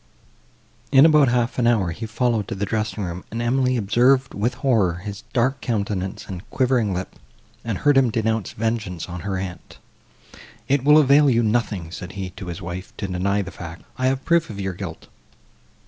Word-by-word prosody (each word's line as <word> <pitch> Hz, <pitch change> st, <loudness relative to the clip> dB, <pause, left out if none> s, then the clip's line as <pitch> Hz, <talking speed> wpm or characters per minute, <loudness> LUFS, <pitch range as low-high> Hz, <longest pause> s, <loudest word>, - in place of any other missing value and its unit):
In 135 Hz, +1 st, +8 dB
about 150 Hz, -3 st, +6 dB
half 120 Hz, 0 st, 0 dB
an 120 Hz, -, +3 dB
hour, 105 Hz, -8 st, +2 dB
he 110 Hz, +7 st, -6 dB
followed 115 Hz, -1 st, 0 dB
to -, -, -4 dB
the 100 Hz, +1 st, -2 dB
dressing 110 Hz, -1 st, -2 dB
room; 90 Hz, 0 st, -5 dB
and 115 Hz, -, -5 dB
Emily 125 Hz, +1 st, +1 dB
observed, 125 Hz, +5 st, +3 dB
with 120 Hz, +5 st, -1 dB
horror, 110 Hz, -10 st, +2 dB
his 100 Hz, +3 st, -7 dB
dark 130 Hz, +2 st, +1 dB
countenance 100 Hz, -4 st, -2 dB
and 90 Hz, -3 st, -6 dB
quivering 125 Hz, -5 st, +1 dB
lip, 90 Hz, 0 st, -5 dB, 0.5 s
and 115 Hz, -4 st, -2 dB
heard 145 Hz, +4 st, +3 dB
him 130 Hz, -3 st, +3 dB
denounce 110 Hz, -1 st, -1 dB
vengeance 105 Hz, -7 st, -2 dB
on 90 Hz, +1 st, -6 dB
her 95 Hz, +1 st, -3 dB
aunt. 95 Hz, -1 st, -7 dB, 0.9 s
"It 140 Hz, -1 st, +2 dB
will 150 Hz, +2 st, +7 dB
avail 145 Hz, 0 st, +6 dB
you 120 Hz, -2 st, +3 dB
nothing," 105 Hz, -7 st, -1 dB
said 90 Hz, +1 st, -7 dB
he 95 Hz, -2 st, -5 dB
to 95 Hz, -, -9 dB
his 85 Hz, -2 st, -6 dB
wife, 90 Hz, +2 st, -7 dB
"to 100 Hz, -, -3 dB
deny 100 Hz, +2 st, 0 dB
the 95 Hz, -, -8 dB
fact; 85 Hz, -2 st, -9 dB
I 130 Hz, 0 st, 0 dB
have 135 Hz, 0 st, -1 dB
proof 170 Hz, -2 st, +2 dB
of 105 Hz, -2 st, -7 dB
your 95 Hz, -1 st, -2 dB
guilt. 90 Hz, -3 st, -8 dB
110 Hz, 190 wpm, -22 LUFS, 95-125 Hz, 0.9 s, In